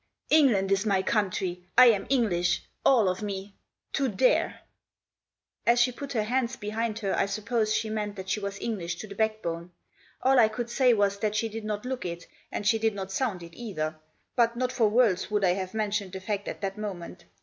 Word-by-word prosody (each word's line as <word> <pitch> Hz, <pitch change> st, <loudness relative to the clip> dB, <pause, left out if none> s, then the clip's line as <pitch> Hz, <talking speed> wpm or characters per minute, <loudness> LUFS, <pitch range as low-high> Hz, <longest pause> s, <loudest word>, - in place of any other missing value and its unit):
"England 235 Hz, -11 st, +4 dB
is 195 Hz, 0 st, +3 dB
my 195 Hz, -3 st, +1 dB
country. 190 Hz, -4 st, -1 dB
I 255 Hz, -, +10 dB
am 205 Hz, -3 st, -2 dB
English— 180 Hz, -9 st, +1 dB, 0.2 s
all 235 Hz, -7 st, +5 dB
of 185 Hz, +3 st, -1 dB
me! 200 Hz, -1 st, -5 dB, 0.2 s
— -, -, -48 dB
to 275 Hz, -, +1 dB
there! 250 Hz, +3 st, +2 dB, 0.5 s
" -, -, -43 dB
As 240 Hz, +1 st, +5 dB
she 245 Hz, +1 st, +4 dB
put 275 Hz, +3 st, -7 dB
her 220 Hz, -3 st, +1 dB
hands 250 Hz, +2 st, 0 dB
behind 215 Hz, +1 st, -3 dB
her 195 Hz, -, +1 dB
I -, -, +1 dB
suppose 215 Hz, +2 st, -1 dB
she 220 Hz, -, 0 dB
meant 210 Hz, -1 st, -3 dB
that 190 Hz, -1 st, -7 dB
she 200 Hz, -, 0 dB
was 200 Hz, -1 st, -5 dB
English 175 Hz, -7 st, -3 dB
to 215 Hz, -, -8 dB
the 200 Hz, -, -8 dB
backbone. 195 Hz, -6 st, -2 dB, 0.5 s
All 265 Hz, 0 st, +5 dB
I 225 Hz, -, +7 dB
could 235 Hz, +2 st, -5 dB
say 250 Hz, -1 st, +4 dB
was 200 Hz, -1 st, +1 dB
that 215 Hz, 0 st, -1 dB
she 225 Hz, +1 st, 0 dB
did 220 Hz, 0 st, -6 dB
not 210 Hz, +1 st, -3 dB
look 255 Hz, 0 st, -3 dB
it, 170 Hz, -1 st, -5 dB, 0.3 s
and 205 Hz, -, -4 dB
she 225 Hz, +2 st, +3 dB
did 220 Hz, -1 st, +1 dB
not 195 Hz, -1 st, -5 dB
sound 195 Hz, -4 st, -1 dB
it 170 Hz, 0 st, -12 dB
either. 160 Hz, -10 st, -4 dB, 0.4 s
But 235 Hz, -1 st, +3 dB
not 255 Hz, 0 st, 0 dB
for 235 Hz, -4 st, +2 dB
worlds 215 Hz, -5 st, +2 dB
would 210 Hz, -1 st, 0 dB
I 180 Hz, -, +4 dB
have 185 Hz, +2 st, -4 dB
mentioned 205 Hz, -3 st, -1 dB
the 190 Hz, -, -4 dB
fact 200 Hz, +1 st, -3 dB
at -, -, -5 dB
that 195 Hz, +1 st, -3 dB
moment. 180 Hz, -4 st, -6 dB
210 Hz, 215 wpm, -27 LUFS, 190-230 Hz, 0.5 s, I